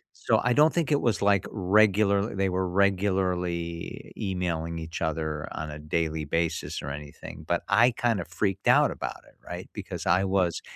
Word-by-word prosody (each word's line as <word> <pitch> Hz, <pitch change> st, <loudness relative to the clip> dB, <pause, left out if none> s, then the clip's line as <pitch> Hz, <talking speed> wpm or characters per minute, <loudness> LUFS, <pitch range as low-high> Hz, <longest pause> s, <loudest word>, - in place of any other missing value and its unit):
So, -, -, +2 dB
I 125 Hz, -, +3 dB
don't 150 Hz, +4 st, +5 dB
think 170 Hz, -4 st, 0 dB
it 145 Hz, -, +3 dB
was, 115 Hz, -, +1 dB
like, 100 Hz, -1 st, +3 dB
regular 100 Hz, +1 st, +3 dB
they 95 Hz, 0 st, +1 dB
were 95 Hz, 0 st, -1 dB
regularly 90 Hz, -3 st, -1 dB
emailing 85 Hz, -4 st, -2 dB
each 80 Hz, 0 st, -6 dB
other 80 Hz, -1 st, -2 dB
on 80 Hz, 0 st, -5 dB
a 75 Hz, -, -8 dB
daily 80 Hz, +1 st, -1 dB
basis 80 Hz, +3 st, -2 dB
or 70 Hz, -, -5 dB
anything, 75 Hz, 0 st, -9 dB
but -, -, +1 dB
I 115 Hz, +5 st, +5 dB
kind 115 Hz, -2 st, 0 dB
of -, -, -8 dB
freaked 95 Hz, -2 st, -2 dB
out -, -, +6 dB
about -, -, -5 dB
it, -, -, -22 dB
right, -, -, -7 dB
because -, -, -6 dB
I 90 Hz, +2 st, +3 dB
was 95 Hz, -3 st, +1 dB
95 Hz, 180 wpm, -27 LUFS, 80-100 Hz, -, out